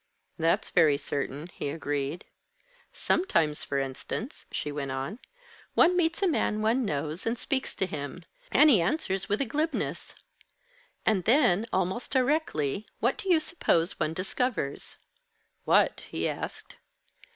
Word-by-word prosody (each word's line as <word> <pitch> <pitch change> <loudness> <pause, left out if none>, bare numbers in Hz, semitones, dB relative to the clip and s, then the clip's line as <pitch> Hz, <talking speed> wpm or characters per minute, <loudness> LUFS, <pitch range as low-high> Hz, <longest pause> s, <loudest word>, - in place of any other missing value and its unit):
"That's 165 +1 +1
very 150 -3 +5
certain," 140 +1 -3
he - - -4
agreed. 145 +1 -3 0.7
"Sometimes, 165 - +1
for 140 - -2
instance," 135 - -4
she 150 - -3
went 140 -2 -4
on, 135 - -4 0.6
"one 360 +2 +5
meets 345 +2 +1
a - - +4
man 215 -10 0
one 235 +4 +2
knows, 155 +3 -2
and 230 +2 0
speaks 265 +2 -2
to 190 - 0
him. 155 +1 -6 0.3
And 300 +2 +7
he 210 -9 +6
answers 190 - -1
with 205 +4 +1
a - - +2
glibness! 305 +7 -2 0.9
And 195 -5 +2
then, 230 -5 +4
almost 190 +5 -1
directly, 250 - 0
what - - +1
do 390 - -4
you 340 -3 +6
suppose 190 - 0
one 155 +1 -1
discovers?" 195 - -2 0.7
"What?" - - +4
he - - -1
asked. - - -6
190 Hz, 140 wpm, -28 LUFS, -, 0.9 s, And